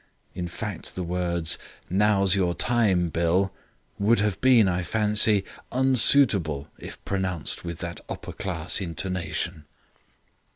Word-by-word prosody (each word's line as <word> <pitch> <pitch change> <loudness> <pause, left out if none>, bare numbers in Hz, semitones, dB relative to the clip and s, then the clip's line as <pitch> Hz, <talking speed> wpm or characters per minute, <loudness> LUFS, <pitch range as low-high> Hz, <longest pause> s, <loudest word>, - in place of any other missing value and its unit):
In 90 -1 -4
fact, 100 +2 -6
the 90 - -3
words, 85 -2 -1 0.3
'Now's 100 0 +3
your 90 -3 +1
time, 100 -8 +2
Bill', 85 +4 +1 0.5
would 110 +4 +3
have 100 -2 -1
been, 125 -5 +5
I 90 0 0
fancy, 105 0 +3 0.3
unsuitable 115 - +3
if - - -9
pronounced 95 -5 -2
with 85 -1 -5
that 85 -1 -6
upper - - -6
class 90 0 -2
intonation. 85 -2 -4
95 Hz, 120 wpm, -25 LUFS, 85-105 Hz, 0.5 s, been